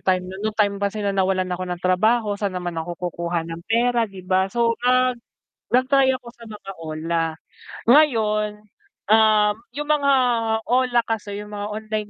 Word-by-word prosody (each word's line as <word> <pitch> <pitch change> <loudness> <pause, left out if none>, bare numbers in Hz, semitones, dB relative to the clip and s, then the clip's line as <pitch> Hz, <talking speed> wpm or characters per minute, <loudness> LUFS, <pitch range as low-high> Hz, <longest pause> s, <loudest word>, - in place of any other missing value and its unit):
time 185 -1 +1
na 185 +1 -8
nun 215 +1 -1
nung - - -30
time 205 -2 +2
na 200 0 -1
nawalan 190 -1 0
ako 180 - -3
ng 180 -1 -5
trabaho, 215 +5 +2
sa'n 200 -2 -2
naman 175 -2 -4
ako 170 +1 -5
kukuha 170 0 -3
ng 165 0 -6
pera, 235 +1 +2
'di 195 -2 -11
ba? 190 +1 +1
So, 230 -1 +1
nag 255 -1 +2 0.5
nag-try 265 +2 +3
ako 245 - -24
sa 235 - -14
mga 205 -2 -9
OLA. 165 +1 -2 0.7
Ngayon, 220 -7 +4 0.6
um, 215 -1 +5 0.2
yung 295 +2 -5
mga 285 -2 +3 0.6
OLA 250 -1 +3
kasi, 205 -2 -3
yung 210 - -11
mga 205 0 -4
online 215 -1 -4
210 Hz, 170 wpm, -22 LUFS, 185-235 Hz, 0.7 s, um